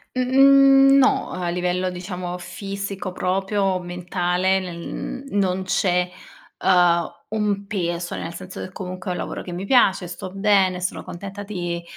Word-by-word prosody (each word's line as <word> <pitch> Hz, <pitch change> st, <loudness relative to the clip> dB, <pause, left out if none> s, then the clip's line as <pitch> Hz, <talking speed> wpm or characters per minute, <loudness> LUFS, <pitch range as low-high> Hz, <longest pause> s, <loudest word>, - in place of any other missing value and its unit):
Mhmm, 275 Hz, +1 st, +6 dB
no. 270 Hz, -, +2 dB
A 180 Hz, -1 st, -3 dB
livello 180 Hz, +1 st, -1 dB
diciamo 180 Hz, 0 st, -5 dB
fisico 195 Hz, 0 st, -5 dB
proprio, 195 Hz, +1 st, 0 dB
mentale, 180 Hz, +1 st, 0 dB
nel 180 Hz, +8 st, -6 dB
non 190 Hz, -2 st, 0 dB
c'è, 180 Hz, -1 st, +1 dB, 0.5 s
uhm, 175 Hz, -2 st, +3 dB, 0.2 s
un 205 Hz, -2 st, -1 dB
peso. 175 Hz, -3 st, -3 dB
Nel 165 Hz, -, -5 dB
senso 185 Hz, +2 st, -9 dB
che 185 Hz, -, -7 dB
comunque 185 Hz, -1 st, -6 dB
è -, -, 0 dB
un -, -, -5 dB
lavoro -, -, -4 dB
che 180 Hz, -, -8 dB
mi 185 Hz, +3 st, -4 dB
piace, 195 Hz, -7 st, +4 dB
sto 175 Hz, +1 st, -7 dB
bene, 195 Hz, -2 st, +2 dB
sono 185 Hz, -, -3 dB
contenta 195 Hz, +3 st, -8 dB
di 175 Hz, -4 st, -4 dB
185 Hz, 145 wpm, -22 LUFS, 180-200 Hz, 0.5 s, Mhmm